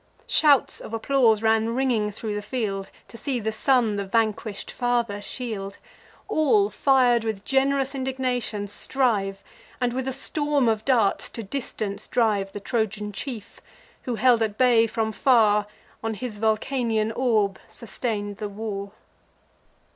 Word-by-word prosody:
Shouts 290 -4 +4
of 225 - -6
applause 225 -2 +2
ran 225 +1 +2
ringing 245 -5 +1
thro' 210 +1 -5
the 205 - -3
field, 205 -4 -3 0.2
To 230 - -10
see 265 -4 -2
the 220 0 -2
son 230 -2 +2
the 200 - -1
vanquish'd 215 0 -1
father 240 -4 -1
shield. 205 -4 -5 0.5
All, 400 +7 +2
fir'd 250 -4 +3
with 215 -3 -4
gen'rous 270 0 +1
indignation, 255 -5 -2
strive, 205 -3 0 0.4
And 245 -1 0
with 260 +1 -3
a - - 0
storm 290 0 +2
of 220 -1 0
darts 235 -7 +2
to 230 - -6
distance 215 -3 -4
drive 210 -5 +1
The 205 - -6
Trojan 210 -1 -2
chief, 220 0 -7 0.4
who, 245 - -3
held 240 0 +4
at 215 -2 -1
bay 240 -3 +4
from 220 0 -1
far, 210 -2 +3 0.4
On 225 -1 -2
his 220 -2 -6
Vulcanian 220 0 0
orb 220 -6 +1
sustain'd 205 -2 -4
the 210 - -4
war. 200 -1 -5
225 Hz, 140 wpm, -24 LUFS, 210-255 Hz, 0.5 s, Shouts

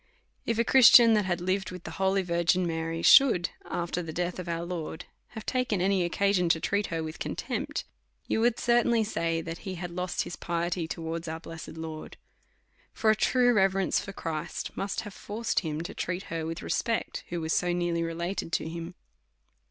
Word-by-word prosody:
If 230 - 0
a 235 - +3
Christian 235 -2 +8
that 210 -2 +2
had 175 -1 -1
lived 185 +2 -1
with 180 -1 -9
the - - -7
holy 190 0 +2
Virgin 170 +1 +2
Mary, 165 0 -3
should, 230 -11 +6 0.2
after 175 +1 -2
the 165 -2 -6
death 175 +2 -2
of 180 -1 -5
our 170 0 -2
Lord, 170 -3 -5 0.3
have 220 - -6
taken 250 -6 0
any 190 0 +2
occasion 180 0 +1
to 165 - +3
treat 200 +4 0
her 165 -1 -3
with 155 0 -7
contempt, - - -3 0.4
you 220 - +1
would 240 0 +3
certainly 235 -1 +3
say, 165 -5 -1
that 165 +1 -6
he 190 -3 -6
had 175 0 -6
lost 180 0 -2
his - - -6
piety 170 0 -2
towards 165 0 -4
our 160 +1 -4
blessed 165 -1 -9
Lord. 160 -1 -7 0.8
For 220 - +3
a - - +3
true 245 +2 +3
reverence 195 -2 +2
for 195 - -6
Christ 165 -4 -5
must 195 +2 -2
have 210 -2 -9
forced 225 +4 -2
him 155 -2 -3
to 170 - -6
treat 180 +2 -3
her 160 -1 -2
with 165 +1 -5
respect, 230 -2 -1
who 175 - -3
was 160 0 -1
so 175 0 +1
nearly 175 -1 0
related 170 +2 -3
to - - 0
him. 170 +2 -6
175 Hz, 190 wpm, -28 LUFS, 165-200 Hz, 0.8 s, Christian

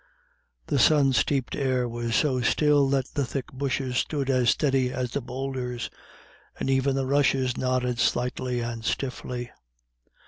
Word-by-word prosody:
The 145 - 0
sun 140 0 +5
steeped 135 0 +1
air 130 -3 0
was 120 -1 -3
so 130 -3 +2
still 145 +2 +3
that 135 -2 +1
the 145 - 0
thick 135 +1 -5
bushes 130 -1 -2
stood 140 -1 0
as 125 -2 +3
steady 135 -4 +2
as 125 -1 -3
the 140 - -2
boulders, 125 -1 -4 0.7
and 135 - 0
even 135 0 +2
the 135 -1 0
rushes 135 -2 +2
nodded 125 -2 -1
slightly 125 0 0
and 115 -1 -4
stiffly. 125 -1 -3
130 Hz, 145 wpm, -26 LUFS, 125-135 Hz, 0.7 s, sun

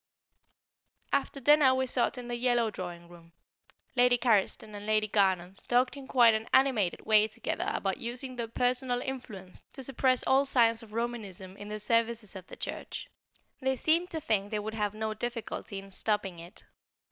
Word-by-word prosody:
After 280 0 0
dinner 285 -1 +5
we 260 0 +1
sat 250 0 +1
in 245 -1 -7
the 240 - -3
yellow 240 -2 +1
drawing 175 -3 -7
room; 170 -1 -16 0.6
Lady 245 0 +5
Carriston 215 -3 +1
and 205 0 -8
Lady 215 0 +2
Garnons 190 -2 +1
talked 250 +2 +2
in 275 -2 -9
quite 240 -4 +6
an 220 +1 -2
animated 250 -9 +2
way 215 -1 +5
together 220 - -3
about 195 -1 -1
using 250 +2 -5
their 235 -2 -3
personal 245 +1 +1
influence 215 -9 -7
to 270 - -7
suppress 255 -1 +1
all 270 +1 +3
signs 230 -3 +3
of 220 -2 -14
Romanism 210 -6 -4
in 205 +1 -9
the 215 0 -4
services 230 -1 0
of 185 -1 -9
the - - -9
Church. - - -6 0.5
They 265 -1 0
seemed 330 +7 +2
to 320 - -3
think 205 -8 0
they 215 - -2
would 215 +1 -4
have 210 -2 -2
no 220 0 -2
difficulty 230 -2 -5
in 195 0 -9
stopping 195 -3 0
it. 170 +2 -12
230 Hz, 175 wpm, -30 LUFS, 205-250 Hz, 0.6 s, quite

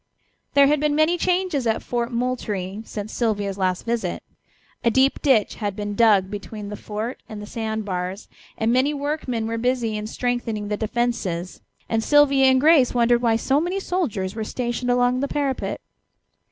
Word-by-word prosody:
There 280 0 +7
had 295 +1 +3
been 300 0 +1
many 310 +3 +3
changes 355 -7 0
at 225 - 0
Fort 240 0 -2
Moultrie 215 -5 -2
since 210 0 -6
Sylvia's 205 -4 -1
last 185 -1 0
visit. 235 0 -2 0.6
A 235 - +4
deep 265 +4 +2
ditch 260 -8 +3
had 205 -3 -3
been 205 0 -4
dug 205 -3 +4
between 205 0 -6
the 210 - -5
fort 215 +4 -5
and 215 - -7
the 210 - -7
sand 220 -1 -4
bars, 185 +1 -4 0.3
and 225 +1 +1
many 270 +4 +2
workmen 280 -5 -2
were 230 0 -2
busy 240 -2 0
in 210 0 -4
strengthening 225 -3 -2
the 210 - 0
defences, 215 -6 -2 0.3
and 225 -1 0
Sylvia 280 -1 +5
and 260 0 +5
Grace 285 -4 +5
wondered 240 0 +3
why 230 -2 +3
so 270 +5 +1
many 360 +4 -1
soldiers 235 - -2
were 220 0 -4
stationed 240 +2 -3
along 245 +1 +2
the 280 - 0
parapet. 280 -2 -2
235 Hz, 175 wpm, -23 LUFS, 210-265 Hz, 0.6 s, There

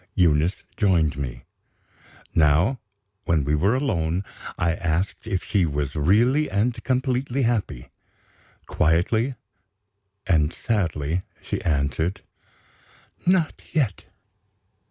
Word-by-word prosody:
Eunice 85 +1 +2
joined 85 -7 +2
me. 60 -4 -5 0.9
Now, 80 - +3 0.5
when 80 -3 +2
we 70 +2 0
were 95 +10 +2
alone, 90 - 0 0.3
I 85 -1 +1
asked 90 +5 -2
if 95 -4 -1
she 100 -4 +1
was 75 -1 -2
really 115 - +3
and 115 +3 0
completely 130 0 0
happy. 110 - -1 0.7
Quietly 110 - +1 0.9
and 80 -4 +2
sadly 85 -6 -1 0.2
she - - -3
answered: 80 +4 -1 1.0
"Not 180 -3 +2
yet." 130 - 0
90 Hz, 95 wpm, -24 LUFS, 80-115 Hz, 1.0 s, Now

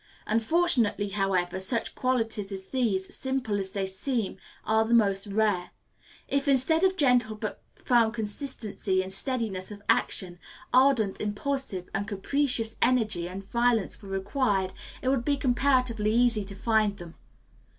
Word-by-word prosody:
Unfortunately, 230 - +2
however, 190 -2 -1
such 225 +5 0
qualities 225 -5 -1
as 190 -1 -6
these, 215 -8 0
simple 260 -6 -2
as 190 -1 -3
they 195 -1 -1
seem, 205 +3 -2 0.3
are 220 0 +3
the 230 +2 +2
most 200 -3 +2
rare. 200 -3 0 0.6
If, 280 +1 -1
instead 280 +5 +3
of 380 0 +3
gentle 245 -7 +3
but 215 -1 -5
firm 235 -3 +2
consistency 215 -4 -2
and 190 0 -5
steadiness 215 -5 -2
of 205 -1 -10
action, 175 -2 0 0.3
ardent, 255 -6 +3
impulsive, 210 -2 -3
and 200 +1 -2
capricious 230 +2 0
energy 220 -9 +2
and 190 +2 -7
violence 235 0 +1
were 200 - -11
required, 195 -1 -1 0.3
it 260 - +1
would 265 -3 +1
be 285 +1 +1
comparatively 250 -5 +1
easy 230 -3 +3
to 200 0 -8
find 215 -1 +1
them. 170 -1 -10
220 Hz, 140 wpm, -27 LUFS, 195-255 Hz, 0.6 s, are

